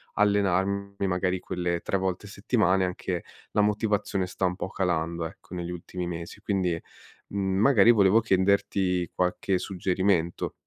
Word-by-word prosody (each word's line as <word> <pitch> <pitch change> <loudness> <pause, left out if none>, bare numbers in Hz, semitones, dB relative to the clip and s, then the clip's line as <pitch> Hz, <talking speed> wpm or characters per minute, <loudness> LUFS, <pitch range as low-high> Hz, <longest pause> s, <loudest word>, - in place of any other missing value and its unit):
allenarmi 100 -1 +1
magari 90 0 0
quelle 90 -1 -2
3 100 - -1
volte 95 +1 -2
a - - -11
settimana 100 -3 +1
e 90 - +1
anche 90 -1 -3 0.3
la - - 0
motivazione 105 -2 0
sta 95 - -2
un 90 0 0
po' 95 - -4
calando, 85 -3 -1
ecco, 90 - -12
negli 90 0 -4
ultimi 90 0 -5
mesi, 85 +3 -6
quindi, 90 -5 0 0.5
mhmm, 95 -1 -1
magari 115 -2 +6
volevo 105 0 +5
chiederti 95 -3 +1
qualche 90 +1 0
suggerimento. 95 -2 0
95 Hz, 145 wpm, -27 LUFS, 90-100 Hz, 0.5 s, magari